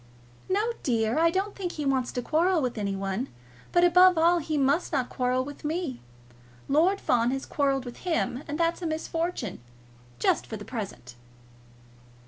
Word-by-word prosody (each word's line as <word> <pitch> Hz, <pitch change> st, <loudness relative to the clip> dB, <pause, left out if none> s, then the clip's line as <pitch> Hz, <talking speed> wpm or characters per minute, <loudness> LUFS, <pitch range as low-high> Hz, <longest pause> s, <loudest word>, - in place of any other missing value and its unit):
"No, 420 Hz, +5 st, +1 dB
dear. 230 Hz, +1 st, +1 dB
I 335 Hz, +1 st, +5 dB
don't 385 Hz, +4 st, -2 dB
think 360 Hz, -3 st, -4 dB
he 300 Hz, -, -4 dB
wants 265 Hz, -2 st, +1 dB
to 245 Hz, -, -3 dB
quarrel 340 Hz, +5 st, +2 dB
with 250 Hz, -4 st, -1 dB
any 200 Hz, -1 st, -1 dB
one; 195 Hz, +6 st, -2 dB, 0.4 s
but 350 Hz, -, +4 dB
above 360 Hz, 0 st, +6 dB
all 340 Hz, +2 st, +4 dB
he 310 Hz, -1 st, -2 dB
must 280 Hz, +5 st, +2 dB
not 265 Hz, -5 st, 0 dB
quarrel 255 Hz, 0 st, 0 dB
with 290 Hz, +1 st, -9 dB
me. 310 Hz, -4 st, -3 dB, 0.7 s
Lord 340 Hz, +8 st, +3 dB
Fawn 240 Hz, -1 st, +2 dB
has 270 Hz, +1 st, -2 dB
quarrelled 275 Hz, -2 st, 0 dB
with 245 Hz, -, -8 dB
him, 325 Hz, -7 st, -1 dB
and 295 Hz, +2 st, -4 dB
that's 335 Hz, +1 st, +1 dB
a 340 Hz, -, -2 dB
misfortune, 320 Hz, -, -3 dB, 0.6 s
just 120 Hz, -, +1 dB
for 220 Hz, -, -5 dB
the 205 Hz, -, -9 dB
present." 190 Hz, -, -6 dB
290 Hz, 170 wpm, -27 LUFS, 245-340 Hz, 0.7 s, above